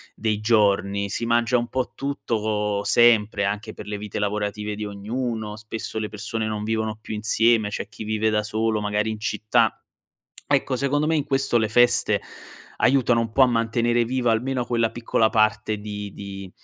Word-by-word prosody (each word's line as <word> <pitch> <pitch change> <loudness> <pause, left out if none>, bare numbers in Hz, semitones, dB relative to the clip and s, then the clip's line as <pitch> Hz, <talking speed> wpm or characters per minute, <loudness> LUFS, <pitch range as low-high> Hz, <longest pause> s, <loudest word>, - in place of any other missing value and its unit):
dei 110 -1 -1
giorni. 100 -2 +2
Si 115 - -3
mangia 120 +1 +2
un 120 0 -2
po' 130 -1 -3
tutto 140 -5 -2
co 105 -1 -1
sempre 110 -2 +4
anche 105 +2 -3
per - - -10
le 105 0 -3
vite 105 0 -5
lavorative 105 0 -2
di 105 0 -5
ognuno, 110 +1 -4
spesso 110 +1 -6
le 105 - -3
persone 110 +1 -3
non 105 -1 -3
vivono 110 0 -1
più 110 - -6
insieme, 110 0 +2
c'è - - -4
chi - - -9
vive 110 0 0
da 105 0 +1
solo, 110 0 -1
magari 105 +1 0
in 110 -1 -4
città. 110 +1 +1 0.7
Ecco, 135 -2 +1
secondo 145 +3 0
me 160 - +1
in 145 - 0
questo 135 -3 +2
le 110 -1 +1
feste 120 +2 +3 0.6
aiutano 125 -3 +3
un 115 -1 -3
po' 135 - +4
a - - +8
mantenere 120 0 +1
viva 125 -2 +1
almeno 125 +2 -1
quella 115 -2 0
piccola 115 -1 +1
parte 110 -1 +1
di 105 -1 -6
di 100 -2 -8
110 Hz, 180 wpm, -23 LUFS, 105-120 Hz, 0.7 s, a